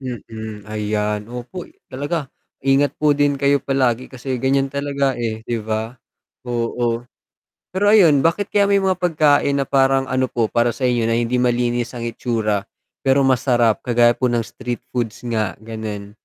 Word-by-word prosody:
Mm, 110 -4 -7
ayan. 105 0 -2
Opo, 125 +9 -7 0.2
talaga. 145 +2 -3 0.3
Ingat 135 +1 +2
po 150 -1 +2
din 145 0 +2
kayo 140 +1 +3
palagi, 130 -3 0
kasi 130 0 -5
ganiyan 135 +1 +1
talaga, 140 -2 -1
eh, 110 -2 -3
'di 120 -1 -2
ba? 110 +2 -3 0.5
Oo. 120 0 -1 0.7
Pero 195 +2 +1
ayun, 180 -9 +6
bakit 170 +7 0
kaya 200 -1 +3
may 200 -1 +3
mga 190 -2 +1
pagkain 150 -4 +3
na 140 - +1
parang 135 0 +2
ano 130 0 +1
po, 115 -3 -1
para 120 0 +1
sa 130 - -6
inyo 120 -2 +2
na 115 - +1
hindi 120 +1 0
malinis 120 0 0
ang 120 - -5
itsura, 115 -3 -1 0.3
pero 135 0 +3
masarap, 120 -3 +2
kagaya 120 -1 +3
po 125 +2 0
ng 120 -1 0
street 120 +2 -6
foods 120 -2 -3
nga, 110 -4 -1
gano'n? 110 -2 -6
125 Hz, 160 wpm, -20 LUFS, 115-140 Hz, 0.7 s, ayun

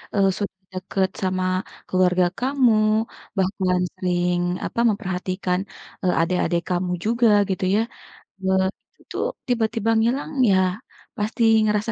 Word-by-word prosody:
Eee, 195 -1 +4
sudah 195 -2 -4
deket 190 +1 -1
sama 185 0 0 0.4
keluarga 185 -1 +3
kamu 260 -2 +3 0.6
bahkan 185 -1 +1 0.2
sering 180 -1 0 0.3
apa - - -4
memperhatikan, 185 -2 -2 0.4
eee, 180 - +2
adek-adek 175 0 +1
kamu 180 0 0
juga 235 +2 +3 0.2
gitu 190 0 -2
ya, - - +3 0.6
eee, 190 0 +2 0.4
itu - - -9 0.3
tiba-tiba 225 -2 0
ngilang 260 +7 0 0.2
ya, 190 - +4 0.6
pasti 215 +3 -1 0.2
ngerasa 210 +1 0
190 Hz, 115 wpm, -23 LUFS, 180-220 Hz, 0.6 s, Eee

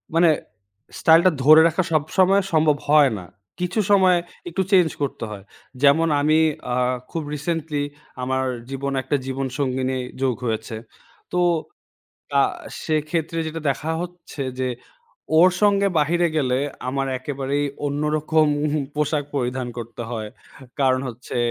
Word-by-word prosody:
মানে, 170 0 +5 0.7
স্টাইলটা 165 +3 +6
ধরে 155 +3 +8
রাখা 175 +3 0
সবসময় 185 +6 +3
সম্ভব 155 -2 +4
হয় 150 -2 +6
না। 90 - -8 0.3
কিছু 180 +4 -1
সময় 185 -3 +5 0.3
একটু 175 +3 -1
চেঞ্জ 180 -4 +5
করতে 140 -4 -3
হয়। 100 -2 -8 0.4
যেমন 150 +4 +5
আমি 155 +2 +3 0.3
আ - - +1 0.4
খুব 165 - -3
রিসেন্টলি 150 -1 -2 0.4
আমার 130 +1 0 0.2
জীবনে 135 0 -3
একটা 130 - 0
জীবনসঙ্গীনি 130 0 -2 0.2
যোগ 130 -2 +1
হয়েছে। 110 -1 -3 0.6
তো 180 - 0 1.0
আ - - +6 0.4
সেক্ষেত্রে 155 +1 -1
যেটা 160 +1 -5
দেখা 150 +4 -3
হচ্ছে 175 -5 -7 0.2
যে, 130 -1 0 0.7
ওর 180 +3 +7
সঙ্গে 200 -1 +4
বাহিরে 170 +3 +2
গেলে, 130 -4 +1 0.3
আমার 135 +1 -1
একেবারেই 140 +1 -2 0.2
অন্যরকম 150 +2 +1 0.5
পোশাক 150 0 0
পরিধান 125 -1 -1
করতে 120 0 -7
হয়। 110 -3 -4 0.5
কারণ 130 -1 +3
হচ্ছে 120 +1 -7
150 Hz, 125 wpm, -22 LUFS, 130-165 Hz, 1.0 s, ধরে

